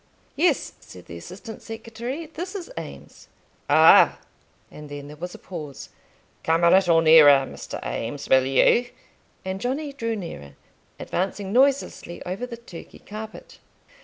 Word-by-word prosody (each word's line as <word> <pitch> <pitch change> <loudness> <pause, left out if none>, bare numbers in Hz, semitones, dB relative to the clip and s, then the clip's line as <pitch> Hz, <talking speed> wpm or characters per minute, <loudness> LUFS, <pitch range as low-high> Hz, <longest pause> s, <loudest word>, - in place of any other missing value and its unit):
"Yes," - - +1
said 90 - -14
the 85 - -9
assistant 200 - -10
secretary, 230 +7 -6
"this 345 +5 -7
is 395 +4 -7
Eames." - - -10 0.4
"Ah!" - - +7 0.5
and 150 -1 -11
then 145 0 -8
there 150 - -10
was 175 +4 -7
a - - -9
pause. 155 -6 -9 0.5
"Come 165 +1 +1
a 170 - +6
little 175 -4 +5
nearer, 150 -4 +7
Mr. - - -8
Eames, 115 - -4
will 130 0 +4
you?" 230 - +4 0.6
and 190 +1 -4
Johnny 280 +4 -3
drew 230 -4 -3
nearer, 70 - -8 0.4
advancing 195 +1 -3
noiselessly 270 -8 +1
over 190 +8 -4
the 235 -1 -8
Turkey 210 -8 -12
carpet. 215 +1 -10
190 Hz, 140 wpm, -24 LUFS, 150-235 Hz, 0.6 s, Ah